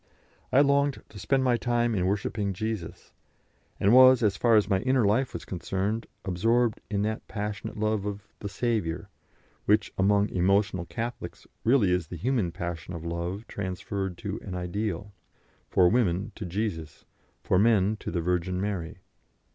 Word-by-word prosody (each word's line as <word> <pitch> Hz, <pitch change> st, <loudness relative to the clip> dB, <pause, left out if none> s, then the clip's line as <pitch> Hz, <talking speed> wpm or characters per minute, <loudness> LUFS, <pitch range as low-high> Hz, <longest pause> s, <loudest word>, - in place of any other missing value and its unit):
I 135 Hz, -, +6 dB
longed 140 Hz, 0 st, +2 dB
to 105 Hz, -, -11 dB
spend 130 Hz, +7 st, +1 dB
my 125 Hz, -2 st, +3 dB
time 120 Hz, -1 st, +1 dB
in 90 Hz, -3 st, +1 dB
worshipping 100 Hz, 0 st, -1 dB
Jesus, 110 Hz, -2 st, -5 dB, 0.7 s
and 100 Hz, +3 st, +4 dB
was, 130 Hz, -1 st, +8 dB
as 100 Hz, -2 st, +3 dB
far 115 Hz, +3 st, +3 dB
as 105 Hz, -3 st, +4 dB
my 95 Hz, -3 st, +2 dB
inner 130 Hz, -1 st, +2 dB
life 120 Hz, +6 st, +2 dB
was -, -, -7 dB
concerned, 95 Hz, +4 st, -2 dB, 0.2 s
absorbed 115 Hz, +5 st, +1 dB
in 100 Hz, -1 st, 0 dB
that 110 Hz, +1 st, -3 dB
passionate 105 Hz, -1 st, -5 dB
love 110 Hz, -1 st, 0 dB
of 100 Hz, +1 st, -6 dB
"the 100 Hz, -, -5 dB
Saviour" 105 Hz, -6 st, -2 dB, 0.6 s
which, 105 Hz, 0 st, +2 dB
among 100 Hz, +1 st, +3 dB
emotional 95 Hz, 0 st, +1 dB
Catholics, 115 Hz, -6 st, -6 dB, 0.2 s
really 115 Hz, -6 st, +4 dB
is 90 Hz, -3 st, 0 dB
the 90 Hz, -, -7 dB
human 115 Hz, -, 0 dB
passion 85 Hz, 0 st, -5 dB
of 85 Hz, 0 st, -7 dB
love 85 Hz, +5 st, -4 dB
transferred 95 Hz, -1 st, -4 dB
to 105 Hz, 0 st, -4 dB
an 95 Hz, -3 st, -6 dB
ideal 100 Hz, +2 st, -3 dB, 0.6 s
for 90 Hz, -, +5 dB
women 100 Hz, -3 st, +1 dB
to 105 Hz, -, -6 dB
Jesus, 85 Hz, -6 st, -4 dB, 0.4 s
for 90 Hz, -, +2 dB
men 105 Hz, -1 st, +3 dB
to -, -, -6 dB
the 85 Hz, -, -1 dB
Virgin 90 Hz, +1 st, -1 dB
Mary. 95 Hz, -3 st, -4 dB
100 Hz, 160 wpm, -27 LUFS, 90-115 Hz, 0.7 s, was